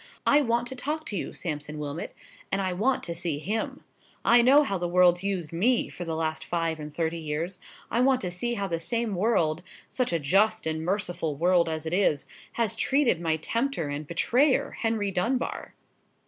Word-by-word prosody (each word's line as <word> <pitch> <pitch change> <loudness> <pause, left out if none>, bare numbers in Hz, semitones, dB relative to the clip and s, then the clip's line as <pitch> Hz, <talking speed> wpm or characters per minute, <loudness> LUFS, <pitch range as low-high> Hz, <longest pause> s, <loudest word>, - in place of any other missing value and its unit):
I 290 +1 +5
want 235 -2 +1
to 260 - -6
talk 300 +5 -3
to 210 - -4
you, - - -3
Sampson 150 -2 -5
Wilmot. 150 +2 -5 0.4
And 195 - +1
I 190 -2 -1
want 240 +9 +1
to 170 - -4
see 170 -3 -3
him. 210 +8 -3 0.4
I 240 +1 +7
know 275 +5 +6
how 200 -9 -2
the 175 - -1
world's 175 0 +4
used 185 -6 -2
me 230 +9 +2
for 175 - -7
the 165 -1 -3
last 160 0 -2
five 165 -2 -1
and 150 0 -7
thirty 165 +2 -2
years; 160 +4 -3 0.3
I 235 - +1
want 260 0 +4
to 180 - -3
see 240 +7 -2
how 200 -2 -2
the 170 -3 -2
same 230 +5 -2
world—such 180 +4 -1
a 170 - +2
just 195 +8 +2
and 160 0 -2
merciful 175 -4 -1
world 170 +2 +3
as 160 0 -4
it 160 - -3
is—has 205 +5 -1
treated 260 - +2
my 160 -2 +1
tempter 230 - -1
and 145 +1 -4
betrayer, 255 - +2
Henry 220 -3 -1
Dunbar!" 230 +8 -2
180 Hz, 190 wpm, -27 LUFS, 160-230 Hz, 0.4 s, I